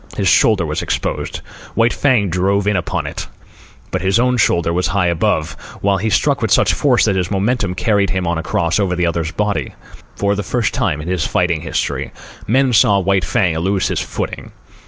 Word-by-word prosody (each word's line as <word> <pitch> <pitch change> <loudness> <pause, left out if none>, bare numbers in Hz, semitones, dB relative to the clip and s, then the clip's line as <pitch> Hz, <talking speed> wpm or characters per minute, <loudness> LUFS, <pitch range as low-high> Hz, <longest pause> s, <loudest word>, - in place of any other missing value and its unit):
His - - 0
shoulder 100 -6 +4
was 75 0 -2
exposed. - - -3 0.3
White 115 +1 +3
Fang 120 -9 +2
drove 95 +3 +1
in 105 0 +1
upon 90 - -2
it: - - -6 0.6
but 95 - -2
his 95 +3 +2
own 125 +1 +2
shoulder 85 -6 +2
was 90 +1 0
high 95 -1 0
above, 85 -2 0 0.3
while 100 -1 +2
he 110 +4 -1
struck - - +1
with - - 0
such - - +3
force - - +2
that 100 - +1
his 90 -2 -1
momentum 100 -1 0
carried 100 +1 +1
him 95 +1 -1
on 85 -1 -1
across 85 +2 0
over 95 -3 0
the 90 0 0
other's 85 -1 -1
body. 105 +1 -2 0.4
For 100 0 0
the 105 - -2
first 115 +3 -1
time 75 0 -1
in 75 - -8
his 90 -3 -1
fighting 85 -3 0
history, 85 - -3 0.4
men 130 +2 +2
saw 105 -2 +5
White 95 -1 +1
Fang 90 -2 0
lose 95 +2 0
his - - -1
footing. - - -5
95 Hz, 200 wpm, -17 LUFS, 85-105 Hz, 0.6 s, saw